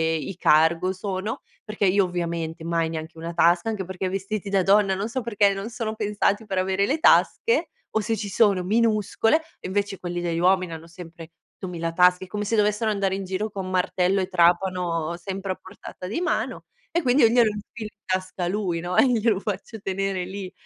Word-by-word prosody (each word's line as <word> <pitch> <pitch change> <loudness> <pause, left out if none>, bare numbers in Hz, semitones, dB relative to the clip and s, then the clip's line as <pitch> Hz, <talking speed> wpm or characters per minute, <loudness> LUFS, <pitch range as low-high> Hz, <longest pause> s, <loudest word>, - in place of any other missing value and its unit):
i 170 +4 -4
cargo 165 +2 +3
sono, 190 +2 -4 0.2
perché 215 -1 -2
io 195 +1 +4
ovviamente 170 -2 -4
mai 165 -1 0
neanche 160 0 -6
una 165 +1 -6
tasca, 170 +4 +3
anche 205 -4 -3
perché 190 +1 -5
i - - 0
vestiti 195 +2 -4
da 195 -1 +2
donna, 195 0 +4
non 200 +3 -2
so 260 +2 -2
perché, 205 -4 +2
non 195 +3 -5
sono 225 -2 -4
pensati 210 0 0
per 195 -3 -3
avere 190 +1 +1
le 290 +9 0
tasche 460 +8 +3 0.3
o - - +4
se 220 +2 -1
ci 205 0 -4
sono 200 -3 +3
minuscole, 225 - +2 0.2
invece 200 +1 -2
quelli 175 -1 -4
degli 170 -1 -1
uomini 185 -1 +2
hanno 165 +1 -9
sempre 165 -1 -11 0.2
8.000 170 -3 -4
tasche, 180 +1 +4
come 210 +2 -4
se 225 - 0
dovessero 210 +1 +2
andare 195 -2 0
in 195 - -4
giro 190 +4 -2
con 190 -2 -5
martello 185 +1 +1
e 185 - -2
trapano 175 -2 +1
sempre 190 +2 -5
a - - -12
portata 185 -1 -10
di 215 - -2
mano, 355 - -1 0.3
e 345 - +1
quindi 255 +2 +3
io - - +8
glielo 235 -1 +4
infilo 210 +1 -8
in 210 - -58
tasca 185 -1 -2
a - - -1
lui, 185 -3 -1
no, 175 +2 -3
e - - +6
glielo 225 -4 +2
faccio 215 +2 -5
tenere 195 -1 -2
lì, 190 0 -7
190 Hz, 200 wpm, -24 LUFS, 180-210 Hz, 0.3 s, io